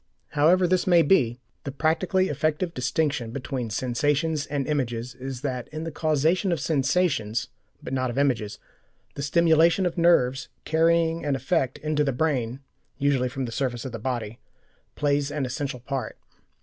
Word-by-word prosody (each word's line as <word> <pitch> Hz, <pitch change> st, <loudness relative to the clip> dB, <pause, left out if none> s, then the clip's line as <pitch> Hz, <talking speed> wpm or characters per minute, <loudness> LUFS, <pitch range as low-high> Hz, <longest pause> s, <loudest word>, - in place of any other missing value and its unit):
However 170 Hz, +5 st, +4 dB
this 185 Hz, +1 st, +1 dB
may 175 Hz, -2 st, +6 dB
be, 130 Hz, -8 st, +3 dB, 0.2 s
the 140 Hz, -, -4 dB
practically 170 Hz, +6 st, +1 dB
effective 155 Hz, +4 st, -1 dB
distinction 130 Hz, -1 st, -1 dB
between 125 Hz, -1 st, -4 dB
sensations 145 Hz, +7 st, 0 dB
and 140 Hz, -2 st, -2 dB
images 125 Hz, -5 st, -2 dB
is 130 Hz, -1 st, -7 dB
that 130 Hz, -4 st, -3 dB
in 155 Hz, +1 st, -6 dB
the 165 Hz, -, -4 dB
causation 160 Hz, +5 st, +1 dB
of 170 Hz, -, 0 dB
sensations, 135 Hz, -, 0 dB, 0.3 s
but -, -, -5 dB
not 130 Hz, -1 st, 0 dB
of 120 Hz, -, -5 dB
images, 125 Hz, -7 st, 0 dB, 0.6 s
the -, -, -6 dB
stimulation 165 Hz, +4 st, +4 dB
of 175 Hz, 0 st, -1 dB
nerves 140 Hz, -6 st, +3 dB, 0.2 s
carrying 165 Hz, +1 st, +2 dB
an 145 Hz, -2 st, 0 dB
effect 130 Hz, -1 st, 0 dB
into 150 Hz, -1 st, 0 dB
the 140 Hz, -, +1 dB
brain, 130 Hz, -3 st, -1 dB, 0.4 s
usually 135 Hz, -3 st, +1 dB
from 130 Hz, +1 st, -4 dB
the 115 Hz, -, -6 dB
surface 120 Hz, -1 st, -2 dB
of 130 Hz, -, -4 dB
the 115 Hz, -, -6 dB
body, 115 Hz, -2 st, -4 dB, 0.6 s
plays 145 Hz, -1 st, +1 dB
an 145 Hz, -2 st, -2 dB
essential 130 Hz, 0 st, -4 dB
part. 135 Hz, +1 st, -4 dB
140 Hz, 160 wpm, -25 LUFS, 125-160 Hz, 0.6 s, may